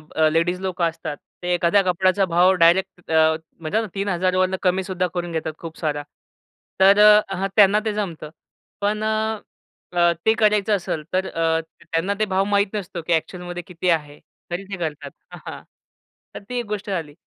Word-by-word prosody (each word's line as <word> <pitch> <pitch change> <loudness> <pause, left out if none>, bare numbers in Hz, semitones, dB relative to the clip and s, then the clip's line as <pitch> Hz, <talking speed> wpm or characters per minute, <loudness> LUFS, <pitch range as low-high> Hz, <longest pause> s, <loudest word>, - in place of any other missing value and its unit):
अ, 155 -1 +4
ladies 165 +3 +1
लोकं 185 -2 -2
असतात 155 -2 -7 0.3
ते 180 - 0
एखाद्या 175 +3 +3
कपड्याचा 185 +2 +2
भाव 175 +1 +4
डायरेक्ट 180 0 +2
अ, 160 0 +4 0.2
म्हणतात 165 +8 -1
ना 220 - -4
3000 185 -2 0
वरून 185 0 +2
कमी 185 0 +1
सुद्धा 185 -1 -1
करून 175 -1 -3
घेतात 160 -1 -3
खूप 165 -1 -9
सारा. 145 -2 -2 0.8
तर 195 +2 +6
अ, 210 -2 +6
ह 195 +2 -1
त्यांना 205 0 +6
ते 215 - 0
जमतं. 175 -7 -4 0.5
पण 210 +1 0
अ, 215 -5 -2
ते 220 - +5
करायचं 210 -1 +3
असेल 170 -4 -3
तर 190 +1 +1
अ, 165 0 +1 0.3
त्यांना 165 +5 0
ते 215 - +2
भाव 190 -1 +1
माहीत 200 0 +2
नसतो 185 -4 -5
की 175 - +2
ॲक्चुअलमध्ये 175 +2 -3
किती 180 0 -2
आहे, 150 -3 -1 0.3
तरी 175 +3 -3
ते 195 - -4
करतात. 150 -4 -5 0.2
अ, - - -9
हां, - - -7 0.7
तर - - -5
ती 250 -1 -2
एक 240 - -4
गोष्ट 210 -1 -5
झाली. 165 -6 -3
185 Hz, 180 wpm, -22 LUFS, 165-200 Hz, 0.8 s, तर